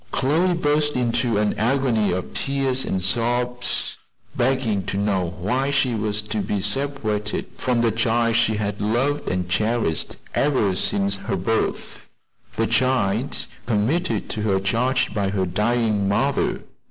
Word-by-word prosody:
Chloe 165 +7 +2
burst 150 -2 +1
into 120 -2 +1
an 105 0 +1
agony 120 -2 +2
of 90 0 -3
tears 135 -1 0
and 95 -1 -1
sobs, 120 +4 0 0.4
begging 120 -5 +1
to 100 - -2
know 95 -4 0
why 125 +10 0
she 135 -3 +2
was 105 -1 -1
to 110 0 -3
be 100 0 -1
separated 105 -1 -2
from 125 -2 0
the 115 -1 +3
child 115 +1 +1
she 115 -2 +3
had 105 -1 -3
loved 125 +8 0
and 90 -1 -1
cherished 105 -2 0 0.2
ever 130 -10 +2
since 100 +1 +1
her 95 - -3
birth; 110 +5 -2 0.5
the - - +1
child 125 -1 +1 0.2
committed 130 - 0
to 110 - -3
her 100 -3 +1
charge 115 +7 0
by 100 -2 0
her 95 -1 0
dying 105 +1 +1
mother? 135 +7 +1
115 Hz, 140 wpm, -23 LUFS, 100-130 Hz, 0.5 s, the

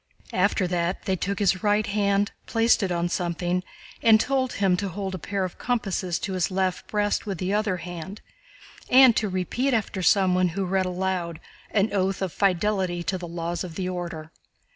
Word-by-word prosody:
After 190 0 +2
that 175 0 -1
they 190 - +1
took 200 +3 -2
his 195 -3 +2
right 210 0 +2
hand, 200 0 +1 0.2
placed 230 +1 +3
it 190 -2 -1
on 170 0 0
something, 175 0 -1 0.4
and 220 -1 +6
told 260 +1 0
him 195 -2 +2
to 200 +1 -2
hold 190 +1 -4
a 185 - -4
pair 195 +4 -2
of 185 - -5
compasses 195 -7 -1
to 195 - -3
his 180 -2 0
left 185 -1 -1
breast 205 +1 0
with 195 -3 -3
the 185 +3 -2
other 210 -3 +1
hand 175 +3 -7 0.7
and 255 -2 +7
to 215 - 0
repeat 235 +8 0
after 205 -3 -2
someone 185 -1 +4
who 195 - 0
read 190 0 0
aloud 180 -2 -2 0.3
an 205 0 +1
oath 190 -1 0
of 185 - -3
fidelity 185 -2 +1
to 185 +1 -2
the 175 - -6
laws 170 +1 -3
of 175 -3 -8
the 185 -2 -2
Order. 170 -3 -5
190 Hz, 185 wpm, -25 LUFS, 180-205 Hz, 0.7 s, and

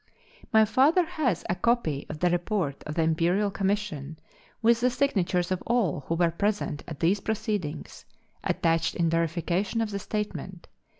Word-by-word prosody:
My 220 -2 +6
father 295 - +4
has 310 - -1
a - - +1
copy 180 - 0
of 155 0 -7
the 180 -1 +3
report 175 -5 -1
of 150 - -4
the 165 - +2
Imperial 170 +6 +2
Commission, 190 -8 -2 0.4
with 230 0 +4
the 250 - +4
signatures 190 -9 0
of 185 - 0
all 210 - +1
who 165 - 0
were 170 0 +2
present 200 -4 -1
at 155 -5 -8
these 185 +5 +3
proceedings, 210 -7 -3 0.4
attached 165 -1 +1
in 165 -2 +1
verification 170 +6 0
of 225 -2 -1
the 200 - -3
statement. 190 -4 -5
185 Hz, 160 wpm, -27 LUFS, 165-220 Hz, 0.4 s, My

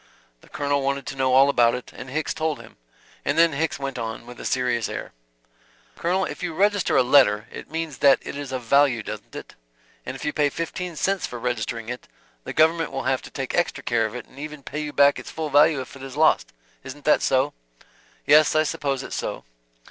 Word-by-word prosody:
The - - -20
Colonel 140 -1 -1
wanted 140 0 -1
to - - -5
know 130 -1 +1
all 135 +1 +7
about 120 -4 +4
it, 125 - -8
and 130 - -8
Hicks 155 +4 -2
told 155 -4 -2
him. 115 -1 -14 0.5
And 145 - -1
then 165 -1 +5
Hicks 160 +3 -1
went 135 -2 -4
on, 115 0 -5
with 120 0 -11
a - - -8
serious 125 -3 0
air, - - -6 0.8
"Colonel, 185 +3 0
if - - -7
you 175 -3 -3
register 205 0 +2
a - - +5
letter, 120 -5 +4
it - - -9
means 160 -1 -4
that 135 -2 +6
it - - -6
is 140 -2 -6
of 130 -2 -4
value, 135 -2 +3
doesn't 105 0 -8
it? - - -8 0.5
And 130 - -6
if 135 - -7
you 150 - -1
pay 145 -1 +2
fifteen 165 +3 -5
cents 195 +5 0
for 120 - -7
registering 115 -1 -3
it, 125 +1 -6 0.4
the - - -4
government 165 +1 +3
will - - -3
have - - 0
to - - -11
take - - -5
extra - - 0
care 115 -2 +1
of 110 - -10
it 125 - -6
and 135 - -16
even 150 -1 -7
pay 145 +3 -5
you 150 -1 -4
back 140 0 +4
its - - -9
full 155 -2 -4
value 145 +1 +5
if 130 - -10
it 135 - -12
is 135 +1 -8
lost. 155 - +3 0.3
Isn't 135 +2 -10
that 150 - +4
so?" 135 +2 +2 0.7
"Yes. 150 +1 +5
I 155 - +5
suppose 140 -3 -2
it's - - -6
so.". - - -4
140 Hz, 225 wpm, -24 LUFS, 125-155 Hz, 0.8 s, all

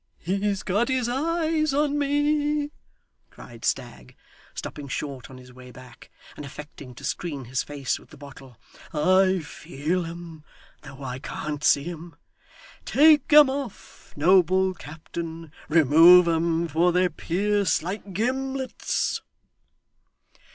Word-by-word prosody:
'He's 195 +3 -2
got 205 +6 0
his 255 -2 0
eyes 310 +2 0
on 290 0 +1
me!' 290 +1 0 0.6
cried - - -14
Stagg, - - -3 0.4
stopping 145 -3 -7
short 135 -1 -5
on 130 - -12
his 125 0 -15
way 125 0 -13
back, 125 0 -15 0.3
and - - -8
affecting 140 -2 -10
to 140 - -13
screen 145 -2 -4
his 130 +2 -2
face 140 -3 -3
with - - -20
the - - -15
bottle. 135 -3 -13 0.4
'I 185 +4 +3
feel 160 +4 -3
'em 165 -2 -10 0.4
though 140 -2 -11
I 130 -1 -5
can't 150 +1 -6
see 140 +3 +3
'em. 170 -1 -8 0.7
Take 300 0 +4
'em 295 -1 +9
off, 265 -5 -7
noble 185 +3 +3
captain. 165 0 -8 0.2
Remove 165 +3 +7
'em, 165 0 +1
for 165 +3 +2
they 180 +1 +2
pierce 190 +3 0
like 195 +3 -6
gimlets. 265 +6 -2
175 Hz, 125 wpm, -25 LUFS, 150-240 Hz, 0.7 s, em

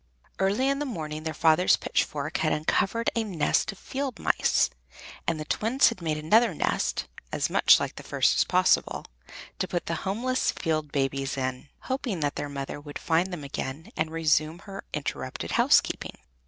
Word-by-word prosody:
Early 200 +7 +2
in 275 0 +1
the 295 - -2
morning 155 -9 -5
their 160 0 -3
father's 160 +4 +4
pitchfork 150 +1 -1
had 155 - +1
uncovered 195 +9 +1
a 230 - +1
nest 175 -8 +1
of 195 - -13
field 265 +1 -4
mice, - - +2 0.6
and 165 -2 0
the 155 - -4
Twins 235 - +3
had 185 - -7
made 155 -2 -1
another 210 +6 +3
nest, - - 0 0.3
as - - -1
much - - +6
like - - -4
the - - -6
first - - +2
as - - +4
possible, - - +2 0.5
to - - 0
put 175 - -2
the 170 - -2
homeless 245 +7 0
field 155 -2 -1
babies 135 0 -1
in, 130 +1 -3
hoping 255 - -3
that 145 0 0
their 145 - -3
mother 140 +1 -5
would 145 0 -7
find 170 +3 +1
them 175 -5 -5
again 140 +2 -5
and 160 - -1
resume 160 0 +1
her 195 -1 -7
interrupted 140 -3 -4
housekeeping. - - +2
160 Hz, 175 wpm, -27 LUFS, 150-200 Hz, 0.6 s, much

